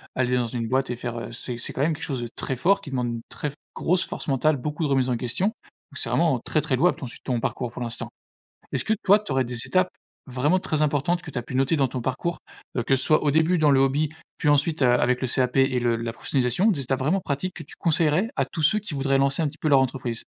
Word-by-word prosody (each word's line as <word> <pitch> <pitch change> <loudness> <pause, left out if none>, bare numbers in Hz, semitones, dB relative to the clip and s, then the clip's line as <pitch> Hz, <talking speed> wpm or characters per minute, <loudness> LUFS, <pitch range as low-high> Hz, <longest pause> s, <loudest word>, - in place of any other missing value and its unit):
aller 125 -1 +1
dans 120 -1 0
une 115 -1 -3
boîte 130 +2 0
et 125 - -2
faire 120 0 -5
heu, - - -7
c'est 125 -2 -6
c'est - - -4
quand - - -3
même 160 +3 +2
quelque 150 - -8
chose 130 -3 -3
de 120 - -5
très 135 - -2
fort 195 +10 +2
qui - - -9
demande 125 -3 -1
une 115 -1 -4
très 150 - -4 0.2
grosse 180 +2 +1
force - - -6
mentale, 145 +2 +2
beaucoup 150 +5 -3
de - - -1
remise 130 -2 +2
en 125 - +1
question. 125 - -1
Donc, 220 - -16
c'est - - -1
vraiment 160 -7 +2
très 155 +6 0
très 150 -3 0
louable 175 +8 +3
ton - - -6
si 120 - -9
ton 125 -3 -1
parcours 120 +1 -3
pour 120 - -8
l'instant. 115 -1 -4 0.6
Est-ce - - 0
que 220 - +2
toi, 205 +2 +6
tu 210 - -8
aurais 130 0 +2
des 120 -1 -3
étapes 185 0 +2 0.4
vraiment 135 +7 +1
très 155 -4 -1
importantes 150 +4 +1
que - - -9
tu - - -6
as 120 - -2
pu 120 - -9
noter 135 +4 +2
dans 140 -3 +2
ton 125 - -4
parcours? 140 +8 -2 0.4
Heu, 120 - +1
que 135 - +3
ce 130 - -1
soit 155 - +3
au 150 - +3
début 160 +4 +3
dans 155 -2 +4
le 135 - +5
hobby, 140 +3 +2 0.3
puis - - -2
ensuite, 145 +2 +2
heu, - - +5
avec 125 +1 +2
le 130 - 0
CAP 125 +1 0
et 135 -1 +3
le 120 -1 +1
la 115 0 -4
professionnalisation, 130 - +1
des 165 - -2
étapes 130 0 -1
vraiment 150 +9 +1
pratiques 165 +6 -3
que 160 - -7
tu 140 - -12
conseillerais 165 +4 +2
à - - +1
tous 160 - -6
ceux 190 +8 +4
qui 210 -5 -7
voudraient 135 0 +1
lancer 135 +3 +2
un - - +2
petit 145 +1 -6
peu - - -1
leur 140 -2 +6
entreprise? 125 -3 -3
135 Hz, 280 wpm, -25 LUFS, 125-155 Hz, 0.6 s, toi